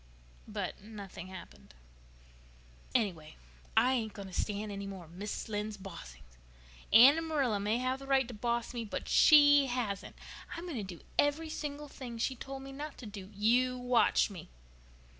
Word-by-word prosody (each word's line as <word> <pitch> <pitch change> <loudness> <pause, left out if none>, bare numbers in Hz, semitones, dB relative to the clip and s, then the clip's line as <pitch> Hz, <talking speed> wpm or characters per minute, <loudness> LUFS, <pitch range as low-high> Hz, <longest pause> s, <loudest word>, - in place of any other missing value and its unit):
But - - -4
nothing 200 -4 -9
happened. 70 - -12 1.2
"Anyway, 175 -10 -1 0.4
I 250 +4 +5
ain't 225 -4 -1
going 200 -2 -8
to - - -13
stand 210 +1 -2
any 200 0 -5
more 190 -3 -8
of 160 - -18
Mrs. 200 +4 -5
Lynde's 210 0 -3
bossing," 170 - -10
spluttered - - -23
Davy. 225 +3 +10
"Anne 285 +4 +7
and 325 - -4
Marilla 270 -10 +1
may 210 +3 +1
have 255 +1 -1
the 275 - -10
right 270 -2 +3
to 245 - -8
boss 235 +2 -2
me, 235 -1 -3
but 215 - -5
she 290 -2 +7
hasn't. 240 -6 -3 0.4
I'm 335 - -6
going 320 -7 -4
to 190 -4 -5
do - - -16 0.2
every 300 +3 +2
single 295 -1 -5
thing 250 -4 -8
she 260 +3 -1
told 270 +1 -7
me 270 - -8
not 290 +2 -7
to 250 - -9
do. 200 -3 -8
You 250 +5 +3
watch 245 -3 +3
me." 180 -4 -10
225 Hz, 180 wpm, -32 LUFS, 195-265 Hz, 1.2 s, Davy